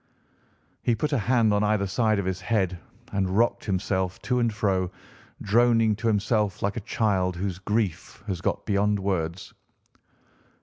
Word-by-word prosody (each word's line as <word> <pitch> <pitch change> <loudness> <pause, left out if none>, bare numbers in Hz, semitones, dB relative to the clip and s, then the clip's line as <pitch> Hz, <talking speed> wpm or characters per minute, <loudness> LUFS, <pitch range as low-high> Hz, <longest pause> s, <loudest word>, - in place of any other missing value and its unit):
He 120 - +2
put 150 +7 -2
a - - +3
hand 115 -1 +3
on 105 0 +2
either 105 -1 +2
side 110 +3 +1
of 100 - -1
his 95 0 -2
head 95 -3 0 0.3
and 95 -1 0
rocked 120 +1 +2
himself 95 -2 -1
to 125 -1 +1
and 120 -2 +2
fro, 95 -4 0 0.5
droning 115 0 +3
to 115 +2 -2
himself 105 -2 +1
like 100 +1 0
a - - -2
child 95 -5 +1
whose 95 0 -3
grief 100 -2 -2
has 95 -5 -3
got - - -2
beyond 105 0 +2
words. 95 -1 -3
100 Hz, 160 wpm, -26 LUFS, 95-110 Hz, 0.5 s, a